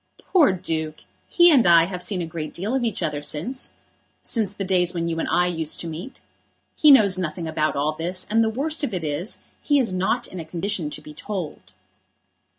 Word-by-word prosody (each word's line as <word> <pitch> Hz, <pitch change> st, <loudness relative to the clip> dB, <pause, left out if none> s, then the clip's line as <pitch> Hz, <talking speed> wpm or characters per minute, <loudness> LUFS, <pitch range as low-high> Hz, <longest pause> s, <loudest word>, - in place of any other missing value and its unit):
"Poor 335 Hz, -, +3 dB
Duke! 160 Hz, -4 st, -3 dB, 0.3 s
He 345 Hz, -1 st, +6 dB
and 260 Hz, -, +5 dB
I 170 Hz, -1 st, +7 dB
have 180 Hz, 0 st, -6 dB
seen 180 Hz, -2 st, -1 dB
a -, -, -3 dB
great 160 Hz, -1 st, -6 dB
deal 200 Hz, +7 st, -3 dB
of 265 Hz, -2 st, +1 dB
each 220 Hz, -6 st, -1 dB
other 150 Hz, -3 st, -2 dB
since, 155 Hz, -, -4 dB, 0.5 s
since 220 Hz, -5 st, 0 dB
the 200 Hz, -1 st, -5 dB
days 180 Hz, -1 st, +2 dB
when 170 Hz, 0 st, -1 dB
you 165 Hz, -1 st, -2 dB
and -, -, -2 dB
I 180 Hz, -, +3 dB
used 165 Hz, -3 st, -2 dB
to 170 Hz, -, -5 dB
meet. 165 Hz, +11 st, -7 dB, 0.6 s
He 305 Hz, -, +5 dB
knows 205 Hz, -9 st, +6 dB
nothing 165 Hz, -1 st, -3 dB
about 155 Hz, -1 st, 0 dB
all 145 Hz, +2 st, +1 dB
this, 175 Hz, +4 st, -3 dB
and 225 Hz, +2 st, +3 dB
the 220 Hz, -, +1 dB
worst 295 Hz, +7 st, -2 dB
of 270 Hz, -, -1 dB
it 175 Hz, -, -3 dB
is, 155 Hz, +7 st, -3 dB, 0.2 s
he 290 Hz, -, +2 dB
is 235 Hz, -8 st, +1 dB
not 185 Hz, +1 st, 0 dB
in 185 Hz, -, -8 dB
a -, -, -4 dB
condition 170 Hz, 0 st, -2 dB
to -, -, -6 dB
be 150 Hz, -, -11 dB
told." 180 Hz, -, -6 dB
180 Hz, 215 wpm, -23 LUFS, 160-215 Hz, 0.6 s, I